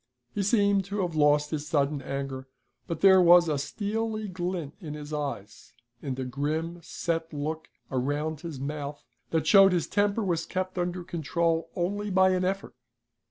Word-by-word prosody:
He 205 Hz, -, -1 dB
seemed 200 Hz, -1 st, +3 dB
to 200 Hz, +1 st, -2 dB
have 175 Hz, -2 st, -2 dB
lost 150 Hz, -1 st, +3 dB
his 150 Hz, -1 st, -3 dB
sudden 145 Hz, -1 st, +1 dB
anger, 135 Hz, 0 st, -5 dB, 0.4 s
but 165 Hz, -2 st, -4 dB
there 190 Hz, -1 st, +7 dB
was 175 Hz, 0 st, +7 dB
a 150 Hz, -3 st, 0 dB
steely 215 Hz, +7 st, -3 dB
glint 175 Hz, -5 st, -4 dB
in 155 Hz, -6 st, -6 dB
his 150 Hz, 0 st, -8 dB
eyes, 135 Hz, -9 st, -5 dB, 0.3 s
and 135 Hz, -3 st, -4 dB
a 130 Hz, -, -3 dB
grim, 155 Hz, +6 st, -2 dB
set 165 Hz, 0 st, -3 dB
look 155 Hz, +2 st, -4 dB, 0.2 s
around 145 Hz, +4 st, -1 dB
his 165 Hz, -6 st, -6 dB
month 145 Hz, +1 st, -5 dB, 0.3 s
that 160 Hz, -1 st, 0 dB
showed 195 Hz, +2 st, +7 dB
his 175 Hz, -3 st, +1 dB
temper 205 Hz, +2 st, +1 dB
was 170 Hz, -4 st, -1 dB
kept 185 Hz, 0 st, -3 dB
under 175 Hz, 0 st, -2 dB
control 165 Hz, -1 st, -1 dB
only 205 Hz, +4 st, -1 dB
by 190 Hz, 0 st, +4 dB
an 185 Hz, 0 st, +1 dB
effort. 195 Hz, +2 st, -2 dB
165 Hz, 165 wpm, -28 LUFS, 145-185 Hz, 0.4 s, there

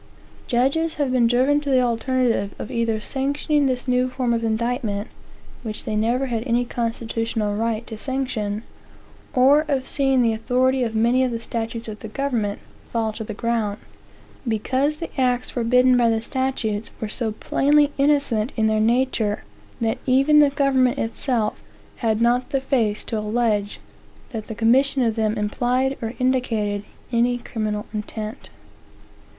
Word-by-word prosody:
Judges 275 Hz, +7 st, +1 dB
have 285 Hz, -3 st, 0 dB
been 245 Hz, -2 st, +4 dB
driven 260 Hz, +5 st, +3 dB
to 285 Hz, -, -4 dB
the 260 Hz, -2 st, +4 dB
alternative 235 Hz, -3 st, 0 dB
of -, -, -6 dB
either 230 Hz, -2 st, 0 dB
sanctioning 285 Hz, +4 st, 0 dB
this 255 Hz, 0 st, -2 dB
new 250 Hz, 0 st, +2 dB
form 250 Hz, -2 st, -1 dB
of 230 Hz, 0 st, -1 dB
indictment, 225 Hz, -2 st, -1 dB, 0.5 s
(which 215 Hz, -2 st, -5 dB
they 215 Hz, -, -3 dB
never 235 Hz, +5 st, +1 dB
had 235 Hz, -4 st, -2 dB
any 240 Hz, +1 st, +2 dB
constitutional 230 Hz, -2 st, -2 dB
right 225 Hz, +1 st, -1 dB
to 220 Hz, -3 st, -8 dB
sanction,) 235 Hz, -5 st, -2 dB, 0.7 s
or 270 Hz, +4 st, +5 dB
of 270 Hz, -3 st, 0 dB
seeing 270 Hz, -3 st, +2 dB
the 230 Hz, -1 st, +2 dB
authority 255 Hz, +4 st, +1 dB
of 225 Hz, -2 st, -1 dB
many 235 Hz, +4 st, +3 dB
of 255 Hz, -, +1 dB
the 230 Hz, -1 st, -3 dB
statutes 230 Hz, 0 st, -4 dB
of 215 Hz, -1 st, -7 dB
the -, -, -7 dB
government 220 Hz, -4 st, -1 dB, 0.3 s
fall 225 Hz, -2 st, -1 dB
to 220 Hz, -, -5 dB
the 215 Hz, -1 st, -6 dB
ground; 225 Hz, -3 st, -1 dB, 0.7 s
because 260 Hz, +7 st, 0 dB
the 315 Hz, -4 st, -4 dB
acts 250 Hz, -1 st, +1 dB
forbidden 250 Hz, +1 st, +3 dB
by 240 Hz, -1 st, +4 dB
the 225 Hz, -1 st, +1 dB
statutes 230 Hz, -4 st, -2 dB
were 220 Hz, -, -3 dB
so 220 Hz, +1 st, -2 dB
plainly 290 Hz, +6 st, +2 dB
innocent 275 Hz, -6 st, +2 dB
in 220 Hz, -, +2 dB
their 215 Hz, 0 st, +2 dB
nature, 230 Hz, -2 st, +1 dB, 0.4 s
that 225 Hz, -1 st, 0 dB
even 275 Hz, +4 st, +5 dB
the 295 Hz, -1 st, +6 dB
government 270 Hz, -3 st, +2 dB
itself 225 Hz, -1 st, -1 dB, 0.4 s
had 220 Hz, -2 st, 0 dB
not 245 Hz, +2 st, +2 dB
the 275 Hz, -2 st, +1 dB
face 235 Hz, -6 st, 0 dB
to 220 Hz, -, -3 dB
allege 210 Hz, -1 st, 0 dB, 0.5 s
that 220 Hz, -4 st, -5 dB
the 220 Hz, -, -6 dB
commission 260 Hz, +4 st, +3 dB
of 225 Hz, -2 st, +1 dB
them 220 Hz, -1 st, 0 dB
implied 245 Hz, +5 st, 0 dB
or 225 Hz, +1 st, -4 dB
indicated 230 Hz, -6 st, 0 dB, 0.3 s
any 240 Hz, +1 st, +2 dB
criminal 215 Hz, -3 st, -3 dB
intent. 215 Hz, +1 st, -6 dB
235 Hz, 155 wpm, -22 LUFS, 220-260 Hz, 0.7 s, the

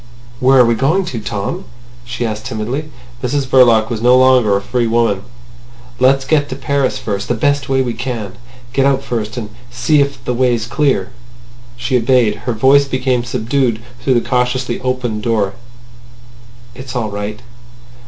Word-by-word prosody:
"Where 135 Hz, 0 st, +4 dB
are 125 Hz, -, +7 dB
we 115 Hz, -, +3 dB
going 155 Hz, +11 st, +1 dB
to, 130 Hz, -10 st, -4 dB
Tom?" 105 Hz, -2 st, -4 dB, 0.4 s
she 120 Hz, 0 st, -4 dB
asked 110 Hz, -1 st, -4 dB
timidly. 125 Hz, +8 st, -4 dB, 0.3 s
Mrs 135 Hz, +2 st, -1 dB
Verloc 120 Hz, -4 st, +4 dB
was 110 Hz, -2 st, -3 dB
no 125 Hz, +2 st, +5 dB
longer 130 Hz, -6 st, +4 dB
a -, -, -1 dB
free 120 Hz, +4 st, -1 dB
woman. 115 Hz, -4 st, +1 dB, 0.8 s
"Let's 135 Hz, +1 st, +3 dB
get 145 Hz, 0 st, +1 dB
to 130 Hz, -, -4 dB
Paris 135 Hz, 0 st, -1 dB
first, 105 Hz, -6 st, -4 dB
the 120 Hz, -, 0 dB
best 145 Hz, +2 st, 0 dB
way 135 Hz, 0 st, +2 dB
we 120 Hz, -2 st, -3 dB
can.... 115 Hz, -5 st, -5 dB, 0.4 s
Go 135 Hz, 0 st, +3 dB
out 135 Hz, -1 st, +1 dB
first, 110 Hz, -2 st, -4 dB
and 110 Hz, -3 st, -5 dB, 0.2 s
see 125 Hz, +5 st, +2 dB
if 140 Hz, -3 st, -3 dB
the 125 Hz, -, -1 dB
way's 120 Hz, -2 st, +1 dB
clear." 120 Hz, -6 st, 0 dB, 0.7 s
She 125 Hz, +1 st, 0 dB
obeyed. 120 Hz, -2 st, +3 dB, 0.2 s
Her -, -, +1 dB
voice 135 Hz, +5 st, +4 dB
came 130 Hz, -2 st, 0 dB
subdued 120 Hz, 0 st, -1 dB, 0.2 s
through 130 Hz, +1 st, +1 dB
the 120 Hz, -, 0 dB
cautiously 125 Hz, 0 st, -1 dB
opened 125 Hz, -4 st, -2 dB
door. 105 Hz, -4 st, 0 dB, 1.2 s
"It's 130 Hz, +1 st, -9 dB
all 110 Hz, -4 st, -2 dB
right." 105 Hz, +2 st, -5 dB
125 Hz, 165 wpm, -16 LUFS, 115-135 Hz, 1.2 s, are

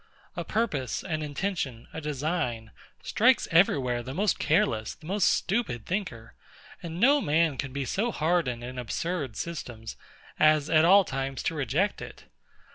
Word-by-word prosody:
A -, -, -3 dB
purpose, 155 Hz, -, -2 dB
an 155 Hz, -5 st, -3 dB
intention, 145 Hz, -5 st, -3 dB
a 160 Hz, -, -5 dB
design, 140 Hz, -6 st, -2 dB, 0.3 s
strikes 250 Hz, +4 st, +3 dB
every 165 Hz, -1 st, +5 dB
where 125 Hz, -3 st, -1 dB
the 130 Hz, +3 st, -7 dB
most 200 Hz, +3 st, +1 dB
careless, 110 Hz, -8 st, +1 dB
the -, -, -17 dB
most 195 Hz, +3 st, +1 dB
stupid 190 Hz, -, -1 dB
thinker; 170 Hz, -, -4 dB, 0.5 s
and 170 Hz, 0 st, -6 dB
no 280 Hz, +6 st, +5 dB
man 155 Hz, -, +2 dB
can 135 Hz, +1 st, -4 dB
be 140 Hz, 0 st, -3 dB
so 215 Hz, -, -1 dB
hardened 155 Hz, -, 0 dB
in 125 Hz, +1 st, -6 dB
absurd 140 Hz, +1 st, -3 dB
systems, 120 Hz, -9 st, -6 dB, 0.4 s
as 155 Hz, -1 st, +4 dB
at 160 Hz, 0 st, +5 dB
all 195 Hz, +3 st, +7 dB
times 135 Hz, -1 st, -4 dB
to -, -, -1 dB
reject 150 Hz, -, -1 dB
it. -, -, -10 dB
155 Hz, 155 wpm, -27 LUFS, 130-180 Hz, 0.5 s, all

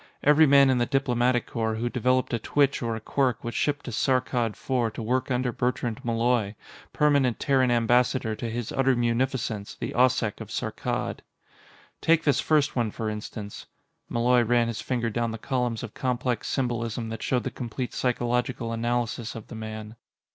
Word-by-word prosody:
Every 150 Hz, +2 st, +6 dB
man 140 Hz, -1 st, +6 dB
in 125 Hz, -, +2 dB
the 120 Hz, -, +1 dB
Diplomatic 125 Hz, -3 st, +1 dB
Corps 110 Hz, -1 st, -2 dB
who 115 Hz, +2 st, -2 dB
developed 125 Hz, +1 st, +1 dB
a 115 Hz, -, +1 dB
twitch 140 Hz, +4 st, +1 dB
or 115 Hz, -2 st, -1 dB
a -, -, -4 dB
quirk 125 Hz, +1 st, 0 dB
was 120 Hz, -, -4 dB
shipped 145 Hz, -1 st, -1 dB
to 125 Hz, -, -5 dB
Saarkkad 125 Hz, -1 st, +1 dB
IV 120 Hz, -3 st, -1 dB
to 115 Hz, -, -5 dB
work 125 Hz, +4 st, 0 dB
under 125 Hz, -1 st, 0 dB
Bertrand 120 Hz, -2 st, -2 dB
Malloy, 115 Hz, -2 st, +1 dB, 0.4 s
Permanent 140 Hz, -5 st, +2 dB
Terran 135 Hz, -3 st, +2 dB
Ambassador 120 Hz, 0 st, +2 dB
to 115 Hz, -, -4 dB
His 115 Hz, 0 st, -4 dB
Utter 135 Hz, -1 st, +2 dB
Munificence, 120 Hz, -3 st, -1 dB
the -, -, -4 dB
Occeq 125 Hz, -3 st, +2 dB
of -, -, -7 dB
Saarkkad. -, -, -3 dB, 0.8 s
Take 165 Hz, -1 st, +3 dB
this 145 Hz, -, +3 dB
first 150 Hz, -3 st, +2 dB
one, 120 Hz, -3 st, +1 dB
for 110 Hz, 0 st, -3 dB
instance. 105 Hz, -1 st, -7 dB, 0.4 s
Malloy 120 Hz, +1 st, +3 dB
ran 120 Hz, 0 st, +2 dB
his 110 Hz, -2 st, -4 dB
finger 120 Hz, -1 st, -1 dB
down 120 Hz, +1 st, -1 dB
the 115 Hz, -, -5 dB
columns 125 Hz, -2 st, -2 dB
of 115 Hz, -, -7 dB
complex 125 Hz, -2 st, -1 dB
symbolism 115 Hz, -3 st, -2 dB
that 115 Hz, 0 st, -6 dB
showed 125 Hz, -2 st, 0 dB
the -, -, -3 dB
complete 125 Hz, 0 st, -5 dB
psychological 120 Hz, -1 st, -1 dB
analysis 120 Hz, 0 st, -2 dB
of 115 Hz, -, -9 dB
the -, -, -8 dB
man. 110 Hz, 0 st, -7 dB
120 Hz, 175 wpm, -26 LUFS, 115-130 Hz, 0.8 s, Every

